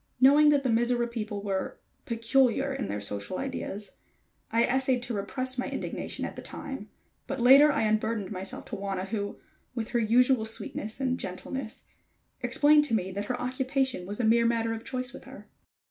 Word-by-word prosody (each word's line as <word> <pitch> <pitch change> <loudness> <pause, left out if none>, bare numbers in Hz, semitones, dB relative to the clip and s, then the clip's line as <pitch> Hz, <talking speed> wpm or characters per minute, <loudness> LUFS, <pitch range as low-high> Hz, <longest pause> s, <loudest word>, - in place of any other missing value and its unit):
Knowing 290 +3 +7
that 285 -2 +3
the 260 - 0
Mizora 240 +1 +2
people 215 -3 -5
were 195 -2 -2 0.3
peculiar 250 +3 +2
in 265 -6 -3
their 105 - -3
social 100 - -3
ideas, 215 -6 -5 0.6
I 230 +1 +3
essayed 260 -1 +2
to 245 - -3
repress 255 +5 -2
my - - -1
indignation - - -4
at - - -6
the - - -7
time, 270 -7 -7 0.4
but 275 - -3
later 275 +5 +8
I - - 0
unburdened 215 -1 0
myself 190 -1 -5
to - - -2
Wauna 195 -1 -3
who, 205 -2 -3 0.4
with 230 -2 -3
her 240 - +1
usual 240 +2 +4
sweetness 220 0 -5
and 255 -1 0
gentleness, 220 +6 -6 0.6
explained 295 0 +4
to 230 - 0
me 190 -3 -1
that 200 +2 -4
her 250 - -3
occupation 260 -5 -1
was 205 +3 -5
a - - 0
mere 230 +1 +4
matter 230 -1 0
of 225 0 -6
choice 255 -1 -3
with - - -11
her. - - -12
235 Hz, 180 wpm, -28 LUFS, 210-260 Hz, 0.6 s, later